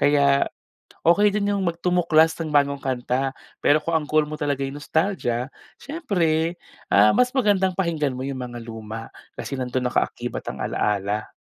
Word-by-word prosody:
Kaya, 140 -1 +4 0.6
okey 205 +5 +5
din 205 0 0
yung 200 - 0
mag 170 -2 -1
tumuklas 165 -3 +4
ng 160 - -2
bagong 140 -1 +2
kanta, 130 0 -1 0.3
pero 145 - +4
kung 165 - -2
ang 150 -2 -2
goal 155 0 +3
mo 150 - -7
talaga 140 -2 0
nostalgia, 145 -4 -1 0.2
siyempre, 175 - -1 0.3
ah, 105 +2 +6
mas 250 - +4
magandang 190 -6 +2
pakinggan 160 -8 0
mo 130 - -4
yung 135 -1 -4
mga 120 -1 -6
luma, 115 0 -7 0.3
kasi 135 - -5
nandun 125 0 -1
nakaakibat - - -2
ang - - -5
ala-ala. 105 +1 -1
145 Hz, 160 wpm, -23 LUFS, 125-170 Hz, 0.6 s, ah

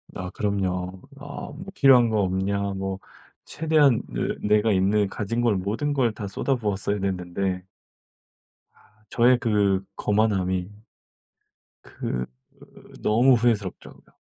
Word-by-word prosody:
아 90 0 -5
그럼요. 95 -3 -2 0.2
"아 145 0 -8
뭐 170 +6 -9
필요한 125 -4 +6
거 110 -2 +1
없냐." 95 +1 0
뭐 95 0 -4 0.5
최대한 150 -6 +2
내 105 - 0
내가 110 +1 +1
있는 100 +2 +2
가진 110 +4 -3
걸 115 -3 +2
모든 110 +10 -2
걸 130 -5 +2
다 105 -1 -6
쏟아부었어야 105 -3 -1
됐는데 95 0 -2 1.1
아 105 0 -28
저의 125 +1 +4
그 100 -5 +1
거만함이 95 -4 0 1.1
그 60 0 -4 0.4
으 - - -17
너무 120 +4 +4
후회스럽죠 110 -6 -1
그냥. - - -22
105 Hz, 235 characters per minute, -24 LUFS, 95-120 Hz, 1.1 s, 필요한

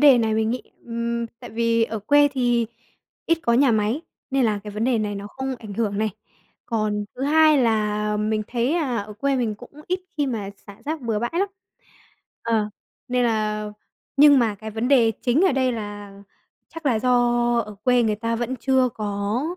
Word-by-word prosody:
đề 280 -4 +7
này 220 -2 +1
mình 220 0 +1
nghĩ, 250 +1 -2 0.2
ừm, 235 0 -2
tại - - -9
vì 230 +1 +2
ở 225 -1 -4
quê 290 +8 +4
thì 240 -3 +1 0.6
ít 330 - +3
có 235 - +2
nhà 260 +2 +5
máy, 220 +6 +1 0.3
nên 270 -1 +2
là 215 -2 +1
cái 210 - -6
vấn 210 +2 -2
đề 250 -2 +2
này 210 -1 -2
nó 200 0 -6
không 265 +5 -4
ảnh 215 -3 -8
hưởng 205 -2 -1
này. 215 0 +1 0.6
Còn 215 -2 -1
thứ 260 - -6
hai 310 +1 +5
là 210 -3 +1
mình 215 +1 0
thấy, 245 +3 0
à, 290 -8 0
ở 210 0 -4
quê 275 +6 0
mình 235 -4 0
cũng 245 +4 -13 0.2
ít 365 +1 -1 0.2
khi 290 -2 +1
mà 215 -6 -3 0.2
xả 200 - -11
rác 310 +1 -3
bừa 230 -4 -1
bãi 240 +2 -2
lắm. 390 +4 +1 0.9
Ờ, 220 -2 +1 0.4
nên 250 0 +1
là 215 -2 0 0.5
nhưng 285 0 +8
mà 225 -4 +2
cái 220 +2 -8
vấn 225 +3 -2
đề 245 -5 +5
chính 255 +5 +2
ở 380 - +4
đây 260 -1 +1
là 205 -2 -6 0.6
chắc 330 -2 -6
là 235 -5 +3
do 250 +2 0 0.5
ở 210 -2 -3
quê 250 -1 +4
người 215 -2 +1
ta 230 +1 -2
vẫn 240 +2 -2
chưa 260 +1 +2
có 205 +2 -2
230 Hz, 200 wpm, -23 LUFS, 215-260 Hz, 0.9 s, nhưng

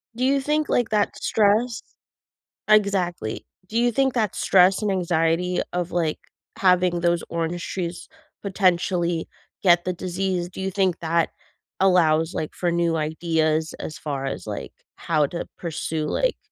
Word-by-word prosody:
Do 250 +2 0
you 275 +1 +2
think, 300 +1 0
like, 240 -2 +1
that 210 -1 +1
stress 220 +3 +2 0.9
Exactly. 190 - +1 0.2
Do 220 - -3
you 240 +1 +3
think 265 +2 +1
that 220 -5 0
stress 190 +2 +4
and 210 - 0
anxiety 175 0 +1
of, 180 0 -2
like, 165 -3 0 0.4
having 180 -2 +3
those 170 -1 +2
orange 170 +1 -2
trees 175 -2 -4 0.3
potentially 180 -3 +1 0.4
get 175 -2 +5
the 185 - 0
disease, 180 0 -2
do 190 - -8
you 190 - -2
think 190 -2 +1
that 165 0 +1 0.5
allows, 165 -3 +3
like, 155 - -4
for 175 -1 0
new 170 -1 +1
ideas 160 0 0
as 155 - -6
far 140 -3 -4
as, 135 - -5
like, - - -5 0.2
how 155 -3 +1
to 170 - -5
pursue, 160 -2 -3
like - - 0
175 Hz, 150 wpm, -23 LUFS, 165-195 Hz, 0.9 s, get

